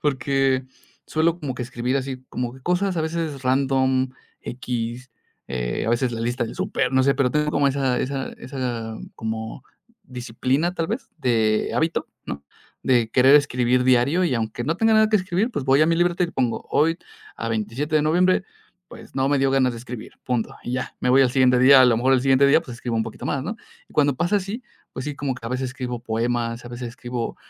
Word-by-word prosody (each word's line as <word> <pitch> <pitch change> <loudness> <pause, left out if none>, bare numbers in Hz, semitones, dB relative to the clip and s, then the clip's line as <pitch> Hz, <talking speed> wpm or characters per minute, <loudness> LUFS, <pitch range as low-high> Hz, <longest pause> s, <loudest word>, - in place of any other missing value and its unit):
porque 135 -1 +1 0.4
suelo 165 +2 +1
como 140 -6 -4
que 125 - -4
escribir 125 +2 -2
así 130 -1 -4
como 125 +1 -4
cosas 180 +1 0
a - - +1
veces 160 -3 -3
random, 130 0 +2 0.3
equis, 120 0 -5 0.4
eh, - - -2
a - - +1
veces 120 +1 +1
la 115 - -4
lista 120 +1 -1
del 115 - -7
súper, 185 -9 -1
no 130 - +4
sé, 135 +1 +3
pero 135 -3 +1
tengo 150 +1 +1
como 145 -1 +2
esa 135 -2 0
esa 135 0 -2
esa 120 -4 -4 0.2
como 110 +3 -5 0.4
disciplina, 130 +7 -1
¿tal 165 -2 -1
vez?, - - -4
de 110 -5 +1
hábito, 165 +1 0 0.2
¿no? 70 +1 -6 0.4
De 120 -4 +2
querer 135 +2 +6
escribir 125 -3 +2
diario, 130 +8 +3
y 140 -7 +1
aunque 115 +1 -3
no 160 +5 -1
tenga 225 +2 +3
nada 215 0 +5
que 220 - 0
escribir, 185 +4 0
pues, 145 - -3
voy 135 +3 +4
a - - +4
mi 165 - +3
libreta 175 +1 +2
y 170 - -5
pongo 125 -3 -1
hoy 165 +3 +2 0.4
a 115 - -4
27 115 +8 -2
de 150 - +3
noviembre, 180 +5 +3 0.5
pues, - - -13
no 135 0 +1
me 145 - +2
dio 135 0 +2
ganas 130 -2 +3
de 115 - -7
escribir 120 -2 -9
punto, 125 -3 -2
y 120 - -4
ya. 125 0 -4
Me 125 - +1
voy 135 +1 +6
al 125 - +3
siguiente 125 -1 +4
día, 135 +1 +8
a - - +8
lo 120 -2 +4
mejor 130 +3 +2
el 130 - +3
siguiente 135 0 +4
día, 145 +4 +5
pues, 125 -7 -9
escribo 120 -2 -3
un 110 - +2
poquito - - -8
más, 135 -2 -1
¿no? 210 - -3 0.3
Y - - -20
cuando 145 -3 +2
pasa 175 +6 0
así, 205 +6 -4 0.3
pues 130 - -6
sí, 150 - -4
como 140 -2 -2
que 115 - -8
a - - -3
veces 130 +1 -2
escribo 125 -2 -5
poemas. 115 +1 -2
A 120 - -8
veces 120 0 -6
escribo 120 0 -5
130 Hz, 215 wpm, -23 LUFS, 120-150 Hz, 0.5 s, día